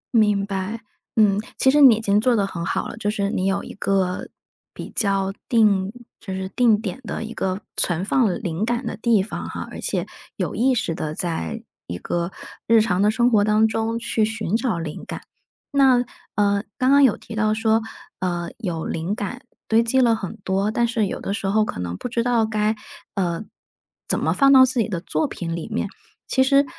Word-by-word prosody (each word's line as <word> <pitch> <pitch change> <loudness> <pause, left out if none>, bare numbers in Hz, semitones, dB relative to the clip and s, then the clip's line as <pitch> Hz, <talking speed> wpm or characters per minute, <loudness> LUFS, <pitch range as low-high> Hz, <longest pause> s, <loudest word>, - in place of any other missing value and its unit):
明 210 -3 +3
白， 200 +3 -3 0.4
嗯。 205 -2 +4 0.2
其 265 - +4
实 295 +1 +4
你 255 -5 +9
已 215 - -4
经 205 -1 +2
做 245 +1 +3
得 200 -3 +2
很 170 -3 -5
好 - - -1
了， - - -7
就 205 -2 -1
是 200 -1 -1
你 185 - -1
有 195 0 0
一 - - -9
个 190 -2 -1 0.5
比 - - -8
较 195 -2 +1 0.2
定 205 -4 +3 0.3
就 190 - -6
是 190 0 -3
定 225 0 +3
点 220 +3 -5
的 225 - -4
一 225 - -7
个 190 +2 -2
存 175 +1 +1
放 230 -4 +2
灵 175 +2 -2
感 240 +3 -1
的 - - -3
地 220 -4 +2
方 215 - -6
哈， - - -6
而 - - -7
且 - - -1 0.3
有 - - -2
意 260 +2 +2
识 170 -8 -1
地 155 -1 -4
在 165 - -3 0.2
一 85 - -4
个 170 - -2 0.4
日 225 0 +6
常 195 -4 +1
的 205 - +4
生 240 +3 +2
活 205 -2 +4
当 215 +1 +4
中 225 +1 -1
去 230 -1 0
寻 220 -2 -1
找 230 -6 0
灵 165 -2 -5
感。 - - -6 0.5
那， 260 -3 +4 0.3
呃， 200 0 +2
刚 255 +1 +2
刚 280 0 +6
有 255 -6 +4
提 - - -11
到 215 0 +1
说 220 0 +2 0.4
呃， 175 -2 -2
有 175 -7 -3
灵 165 +5 -2
感 220 +4 -5 0.3
堆 225 +1 +4
积 235 +3 +2
了 235 -3 +4
很 195 -5 -6
多， 195 +2 0
但 235 +2 +1
是 230 -3 0
有 - - -4
的 195 - -3
时 200 - -3
候 215 +2 +3
可 90 - -5
能 90 0 -4
不 - - -5
知 235 -1 -1
道 240 -2 +2
该， 215 0 0 0.4
呃， 180 -1 -1 0.6
怎 - - +1
么 - - +1
放 275 -1 +5
到 260 -1 +9
自 255 -1 +2
己 225 - +2
的 180 -5 -3
作 160 -3 0
品 165 -1 -4
里 170 - -5
面。 220 -1 -1 0.4
其 260 - +2
实， 275 +2 +4
215 Hz, 225 characters per minute, -22 LUFS, 190-230 Hz, 0.6 s, 你